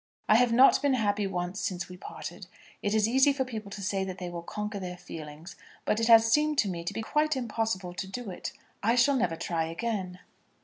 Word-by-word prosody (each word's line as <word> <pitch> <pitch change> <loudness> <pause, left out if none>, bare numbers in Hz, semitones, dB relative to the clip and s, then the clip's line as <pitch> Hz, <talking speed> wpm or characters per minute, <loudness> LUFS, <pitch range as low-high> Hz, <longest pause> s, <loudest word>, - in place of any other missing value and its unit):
I - - +6
have 245 0 +4
not 260 +3 +6
been 285 -2 +3
happy 205 -3 +1
once 180 +1 -3
since 180 -3 -3
we 180 - -10
parted. 180 - -8 0.3
It 205 +1 0
is 215 0 +3
easy 265 +4 +5
for 270 -1 -1
people 220 -5 -6
to 200 0 -7
say 195 0 0
that 190 -1 -5
they 180 -1 -5
will 170 -1 -5
conquer 210 +3 -5
their 180 -1 -6
feelings, 155 0 -9 0.3
but 215 - +1
it 225 - +1
has 225 -1 +8
seemed 300 +2 +3
to 215 - +3
me 170 -3 -4
to - - -2
be 225 - -2
quite 300 +5 +1
impossible 225 -7 -2
to 190 +2 -5
do 215 +1 -6
it. 180 - -5 0.3
I 230 +3 +3
shall 265 +3 +4
never 180 -10 +1
try 165 0 -2
again. 185 +1 -3
210 Hz, 225 wpm, -29 LUFS, 180-235 Hz, 0.3 s, has